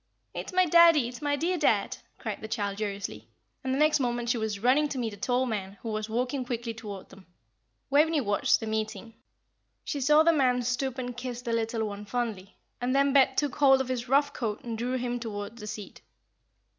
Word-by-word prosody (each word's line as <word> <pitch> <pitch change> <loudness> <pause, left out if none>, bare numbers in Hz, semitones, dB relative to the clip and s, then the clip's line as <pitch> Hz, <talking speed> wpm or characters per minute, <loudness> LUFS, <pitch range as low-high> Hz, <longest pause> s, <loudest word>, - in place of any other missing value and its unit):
"It - - -5
is - - -8
my 370 0 +4
daddie. 335 -4 +6
It - - -3
is 245 - -10
my 290 -1 +1
dear 345 +4 -1
dad," 295 - +2 0.2
cried - - -5
the 220 - -6
child, 205 -2 -3
joyously, 200 -1 -4 0.4
and 260 - -2
the 265 - +1
next 305 0 +4
moment 240 -2 -1
she 240 - +2
was 220 -2 -2
running 260 +8 +3
to 280 - -4
meet 230 -4 -2
a - - -10
tall 250 +5 +1
man, 200 -4 -4
who 230 - -4
was 215 0 -3
walking 250 +4 -1
quickly 235 -2 -4
towards 210 -4 -8
them. 190 0 -16 0.6
Waveney 305 +2 +4
watched 205 -6 +2
the - - -3
meeting. 220 +1 -4 0.7
She 285 - -3
saw 300 +4 +5
the 335 +1 +5
man 250 -4 +2
stoop 250 +2 -1
and 245 -1 -4
kiss 245 0 -6
the 235 -2 -2
little 225 0 -1
one 205 0 -7
fondly; 215 -4 -4 0.3
and 250 +2 0
then 275 0 +3
Bet 265 -1 +4
took 290 -4 0
hold 270 -2 +6
of 265 -1 -2
his 245 -1 -3
rough 285 +1 +3
coat 220 -5 -3
and 235 -2 -4
drew 245 +3 -2
him 245 -1 -2
towards 220 0 -6
the 210 - -7
seat. 210 -1 -8
245 Hz, 220 wpm, -28 LUFS, 220-275 Hz, 0.7 s, daddie